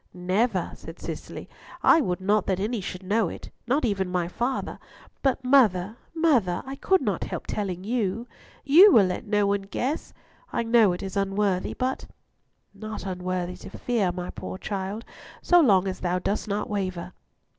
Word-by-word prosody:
"Never," 185 +7 0
said - - -11
Cicely; - - -7 0.4
"I 325 - +6
would 180 -8 -1
not 205 +1 +2
that 190 -1 0
any 215 +2 -1
should 185 0 -6
know 205 0 +1
it, - - -9 0.2
not 270 +3 +2
even 195 -4 0
my 180 -2 -1
father; 240 +8 -3 0.4
but 270 -1 +1
mother, 220 -7 +4 0.2
mother, 250 - +2
I 270 +1 -6
could 380 +5 +2
not - - -1
help - - -5
telling 190 -4 -3
you. 225 0 -1 0.4
You 345 +9 +8
will 215 - +6
let 185 +4 -3
no 205 -1 +2
one 200 0 +1
guess? 250 +9 -3 0.4
I - - 0
know 225 -3 +5
it 175 - -6
is 190 -1 -6
unworthy, 195 -1 0
but—" 260 +1 -2 0.7
"Not 215 -1 -7
unworthy 180 -1 -3
to - - -10
fear, 220 -7 0
my 180 0 -5
poor - - -7
child, 200 +3 -4 0.4
so 350 -1 +6
long 195 - +4
as 185 -1 -4
thou 180 0 0
dost 200 +4 -2
not 205 0 -2
waver." 185 -3 -3
200 Hz, 170 wpm, -26 LUFS, 185-235 Hz, 0.7 s, You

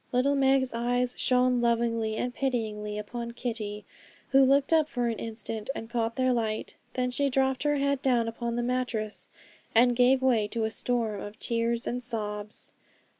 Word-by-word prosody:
Little 255 +3 +2
Meg's 270 -2 +3
eyes 245 +1 0
shone 250 -1 +2
lovingly 230 -2 +1
and 245 +2 -2
pityingly 215 -6 -2
upon 235 +3 -5
Kitty, 220 -4 -4 0.4
who 270 0 +6
looked 275 +3 +3
up 310 -2 +4
for 245 -2 -1
an 225 - -3
instant, 225 0 -5
and 225 +1 -7
caught 230 -1 -1
their 255 -1 +2
light. 220 -2 -2 0.2
Then 250 -1 0
she 280 +3 +1
dropped 265 0 +1
her 295 0 +2
head 280 -1 0
down 245 -4 +2
upon 235 +1 -3
the 240 - -1
mattress, 245 -4 -2 0.5
and 245 +1 +5
gave 255 +2 +4
way 235 -5 +3
to 225 +1 -2
a 220 - 0
storm 225 -4 -1
of 205 +1 -8
tears 230 0 0
and 250 +1 -2
sobs. 210 -3 -4
240 Hz, 175 wpm, -28 LUFS, 225-255 Hz, 0.5 s, who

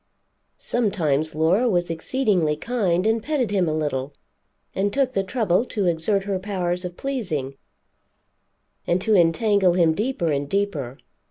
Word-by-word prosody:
Sometimes 160 - 0
Laura 180 +10 +2
was 175 -4 0
exceedingly 180 - 0
kind 190 -2 0
and 225 +1 +2
petted 265 -6 -1
him 185 -5 +1
a - - -1
little, 145 -3 -2 0.6
and 200 +1 0
took 265 +1 0
the 195 - +1
trouble 205 -2 +1
to 205 -5 -2
exert 175 +4 +1
her 195 -1 -2
powers 180 -2 -2
of 180 -1 -6
pleasing, 180 - -3 1.3
and 175 - +2
to 215 +4 +1
entangle 185 +2 +3
him 170 -3 +3
deeper 205 -4 -1
and 140 0 -2
deeper. 155 -11 -2
185 Hz, 145 wpm, -23 LUFS, 160-215 Hz, 1.3 s, entangle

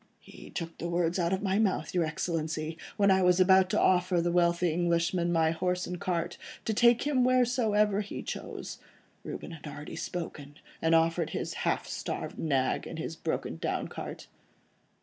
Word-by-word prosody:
"He - - -13
took 165 -2 -5
the 170 - -3
words 170 +1 +1
out 170 0 +1
of 190 +1 -1
my 195 +1 +1
mouth, 185 -8 0
your 175 -2 +2
Excellency; 160 0 -2 0.2
when 200 -1 +4
I 190 0 +4
was 180 0 +4
about 190 0 +6
to - - +1
offer 180 -1 +3
the 170 +1 +1
wealthy 170 -1 +2
Englishman 170 +1 +1
my 160 -1 +3
horse 180 +2 -1
and 180 -1 -6
cart, 175 -1 -2 0.3
to 220 - 0
take 235 +2 +5
him 280 -4 +2
wheresoever 230 -5 +3
he 205 - -6
chose, - - -6 0.4
Reuben - - -6
had 160 -2 -9
already 150 +1 -7
spoken, 145 -5 -6 0.3
and 165 0 +4
offered 165 0 +2
his - - -3
half - - -1
starved - - -5
nag, 135 -4 0
and 165 - -7
his 160 0 -4
broken 160 - -3
down - - -2
cart." - - -7
175 Hz, 175 wpm, -29 LUFS, 165-190 Hz, 0.4 s, about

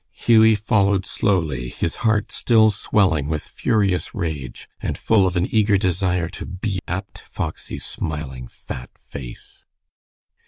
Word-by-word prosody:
Hughie 110 -1 +5
followed 100 -2 +2
slowly, 80 - 0
his 85 - -3
heart 110 -2 +1
still 110 -2 +4
swelling 95 -7 +1
with 80 -1 -2
furious 100 -6 0
rage, 75 -7 -4
and - - -2
full 100 -4 +3
of 90 0 -1
an 85 - +2
eager 105 -2 +4
desire 90 -2 0
to - - -8
be 95 +1 -3
at 95 +3 -5
Foxy's - - -5
smiling, 65 -5 -4
fat - - -9
face. 65 -4 -10
95 Hz, 130 wpm, -22 LUFS, 80-105 Hz, -, Hughie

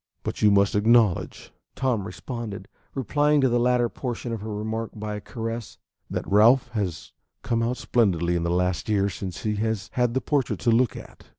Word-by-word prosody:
"But - - -4
you 105 - +6
must 100 -1 +3
acknowledge," 110 -2 +2 0.2
Tom 120 -7 0
responded, 110 -5 -6 0.3
replying 145 +4 +2
to 130 - +3
the 120 0 +2
latter 125 0 +3
portion 120 -1 -5
of 110 - -4
her 110 +1 -5
remark 110 +2 -3
by 105 0 -4
a 105 - -5
caress, 115 0 -6 0.3
"that - - -3
Ralph 115 +7 +5
has 100 -9 -4 0.3
come 115 -1 0
out 120 +2 -1
splendidly 90 -7 +1
in 85 - 0
the 85 - -1
last 90 +2 0
year 100 -2 +2
since 95 0 -6
he 105 -1 -1
has 110 -1 -2
had 125 -1 +1
that 130 - +1
portrait 140 +1 0
to 120 - +3
look 120 +1 +3
at." - - -13
110 Hz, 190 wpm, -25 LUFS, 100-120 Hz, 0.3 s, you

